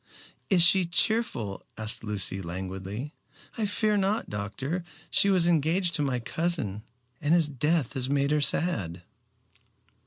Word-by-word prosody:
"Is 180 -4 +6
she 185 +1 +5
cheerful?" 170 - 0
asked 110 +1 -1
Lucy 95 -3 -1
languidly. 95 - -5 0.4
"I 220 -3 -1
fear 210 +1 +1
not, 200 +3 -1
doctor. 130 - -4 0.3
She 200 - +5
was 185 -3 +4
engaged 170 +2 +2
to 150 - 0
my 135 -3 0
cousin, 135 - -2 0.4
and 155 +2 +3
his 165 -3 +4
death 150 0 0
has 130 -1 -2
made 140 0 +1
her 150 0 +2
sad." 95 - -1
145 Hz, 135 wpm, -27 LUFS, 105-175 Hz, 0.4 s, Is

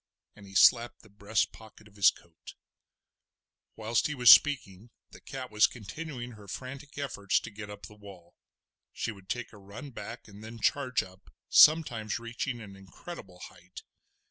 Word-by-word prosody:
and 100 -2 -14
he 95 - -14
slapped 120 +4 +4
the 110 - -19
breast 105 +2 -1
pocket 110 -1 -16
of 105 - -22
his 100 -2 +6
coat. 85 -1 -13 1.2
Whilst 110 +1 0
he 150 - -4
was 125 -3 +8
speaking 115 -7 +4 0.2
the - - -14
cat 130 -3 -8
was 105 0 +5
continuing 120 +3 -8
her 105 -3 -14
frantic 135 +7 -8
efforts 110 -8 0
to 115 - -9
get 105 0 -9
up 105 -2 -9
the 105 - -13
wall. 100 -5 -14 0.6
She - - -4
would 95 -3 -15
take 120 -2 -4
a - - -13
run 105 +9 -10
back 115 0 -9
and 105 0 -13
then 115 +1 -9
charge 130 +1 +1
up, 95 -3 -17 0.2
sometimes 120 -9 +5
reaching 120 +1 -4
an 100 -3 -11
incredible 95 - -11
height. 90 +1 -14
110 Hz, 170 wpm, -29 LUFS, 100-125 Hz, 1.2 s, was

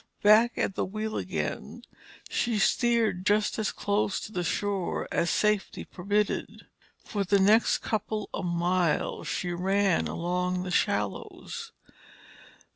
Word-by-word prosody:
Back 220 +3 +6
at - - 0
the - - -1
wheel 215 +3 -4
again, - - -4 0.4
she 235 -2 0
steered 225 -3 +2
just 210 +2 +1
as 215 - 0
close 205 -1 0
to - - -8
the 180 -4 -2
shore 195 +1 -1
as 170 - +1
safety 210 +1 0
permitted. 205 +3 -2 0.4
For 205 -3 -2
the 200 +1 +3
next 210 +4 +4
couple 215 -1 -2
of 190 - -3
miles 175 -1 0
she 180 - -2
ran 190 +1 +1
along 180 +1 -1
the 185 - -5
shallows. 460 - -2
200 Hz, 125 wpm, -28 LUFS, 180-215 Hz, 0.4 s, Back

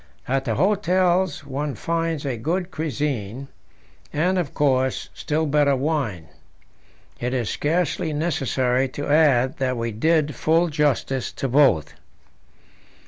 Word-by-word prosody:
At 135 +1 0
the 115 -4 0
hotels 185 - +1
one 140 +1 -3
finds 165 -3 -2
a 135 -3 -1
good 175 - -2
cuisine, 135 - -3 0.6
and, 180 +5 +1
of 160 -6 -2
course, 130 -3 +1
still 155 +1 -1
better 145 -1 +3
wine. 130 - -2 0.9
It 125 +2 -2
is 120 -4 -1
scarcely 165 +1 0
necessary 135 -4 0
to 145 - -3
add 145 -4 +3
that 130 -2 -1
we 115 0 -2
did 150 +6 +1
full 165 +6 +2
justice 145 -4 0
to 135 - -3
both. 130 - +3
145 Hz, 125 wpm, -23 LUFS, 130-160 Hz, 0.9 s, better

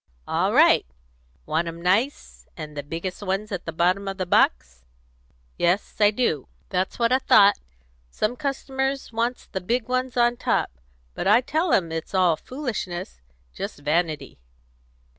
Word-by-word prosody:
"All - - +1
right! - - +5 0.6
Want 165 +2 0
'em 165 0 -6
nice, 200 +11 -1
and 155 -2 -7
the 145 - -3
biggest 165 +7 -5
ones 200 +2 -2
at 190 -3 -4
the - - -2
bottom 180 +4 +1
of 195 0 -4
the 185 - -2
box?" 65 - +1 0.8
"Yes, 180 +4 +1
I 205 -1 +6
do." 210 - -1 0.2
"That's 185 0 -1
what 235 0 +2
I 260 - +4
thought. 205 -5 +5 0.5
Some 215 - -1
customers 270 -2 -3
wants 235 +2 -1
the 190 - -5
big 230 +5 -1
ones 255 -1 -1
on 240 0 +3
top; - - 0 0.4
but - - -3
I 215 +5 +6
tell 315 +6 0
'em 170 -4 +2
it's 165 +4 -5
all 180 -3 +4
foolishness; 190 - -5 0.3
just - - -6
vanity." 150 - -1
195 Hz, 155 wpm, -24 LUFS, 170-240 Hz, 0.8 s, I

